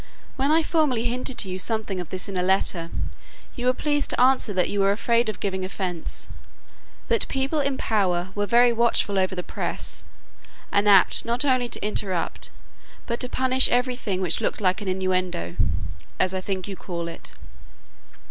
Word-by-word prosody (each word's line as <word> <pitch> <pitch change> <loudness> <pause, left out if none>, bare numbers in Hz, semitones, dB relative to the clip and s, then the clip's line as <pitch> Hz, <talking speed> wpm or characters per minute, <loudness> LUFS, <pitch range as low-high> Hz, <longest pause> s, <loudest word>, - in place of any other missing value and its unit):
When 275 +1 0
I 320 +1 +4
formerly 300 -9 +1
hinted 250 +1 -1
to - - -1
you 185 0 -4
something 215 -2 -1
of 180 - -6
this 185 -1 -3
in 195 - -6
a 180 - +1
letter, 180 -2 +1 0.7
you 245 -1 -2
were 255 - +4
pleased 290 0 0
to - - 0
answer 255 -3 +4
that 185 -2 +1
you 205 - -2
were 195 0 +4
afraid 230 +2 +1
of 215 - -5
giving 190 -2 -2
offence; 185 -3 -4 0.8
that 465 - +2
people 270 +3 -1
in 275 -2 0
power 185 -4 0
were 205 0 -1
very 240 +3 +5
watchful 230 -4 +2
over 185 0 0
the 180 - -4
press, - - -4 0.7
and 205 +1 +3
apt 195 -2 +6
not 235 +4 -1
only 255 -3 +2
to 210 - -4
interpret, 190 -4 -2 0.6
but 235 0 -3
to 250 - -1
punish 260 0 +4
every 250 +1 +1
thing 195 -6 -3
which 180 -3 0
looked - - -1
like 190 +1 +1
an 205 - -6
innuendo 185 - -1 0.6
(as 185 0 +2
I 185 - -2
think 190 -1 -4
you 195 - -5
call 170 -2 -5
it). 165 - -9
205 Hz, 185 wpm, -24 LUFS, 185-245 Hz, 0.8 s, apt